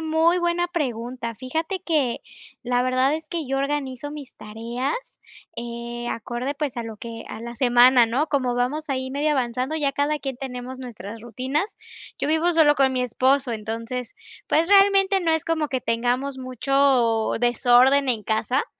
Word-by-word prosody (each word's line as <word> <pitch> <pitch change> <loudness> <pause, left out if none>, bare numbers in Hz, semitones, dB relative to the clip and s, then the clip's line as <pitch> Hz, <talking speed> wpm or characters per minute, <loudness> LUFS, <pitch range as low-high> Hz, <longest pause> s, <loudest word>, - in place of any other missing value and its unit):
muy 320 +2 +2
buena 345 0 +1
pregunta. 245 -7 -4
Fíjate 320 - -3
que 295 -9 0 0.4
la 245 0 +1
verdad 255 +3 +2
es 315 0 -6
que 330 -5 -3
yo 270 +1 -1
organizo 275 -1 -3
mis 290 -3 -9
tareas, 235 - -4 0.6
eh, 235 0 -5
acorde, 240 +5 -3
pues, 290 -4 -3
a 235 - -2
lo 225 -2 -7
que, 230 +1 -8
a - - -7
la 235 +1 -7
semana, 245 -1 +5
¿no?, 265 +7 0
como 255 -5 0
vamos 295 +6 -1
ahí 260 -1 -2
medio 290 +2 0
avanzando, 255 +2 -1
ya 280 -3 0
cada 290 +2 0
quien 270 -3 -5
tenemos 255 0 -6
nuestras 225 -3 -8
rutinas. 260 - -3 0.4
Yo - - -1
vivo 320 +3 +2
solo 310 -3 +5
con 270 -2 +3
mi 255 - 0
esposo, 255 +2 +1
entonces, 230 +3 -5 0.4
pues, 320 +2 +3
realmente 390 0 +5
no 335 -2 +1
es 320 -1 +1
como 320 -2 0
que 260 -2 -2
tengamos 245 +4 -1
mucho 255 -3 +1
desorden 245 +3 +4
en 225 -4 0
casa, 225 +5 0
260 Hz, 165 wpm, -23 LUFS, 240-295 Hz, 0.6 s, semana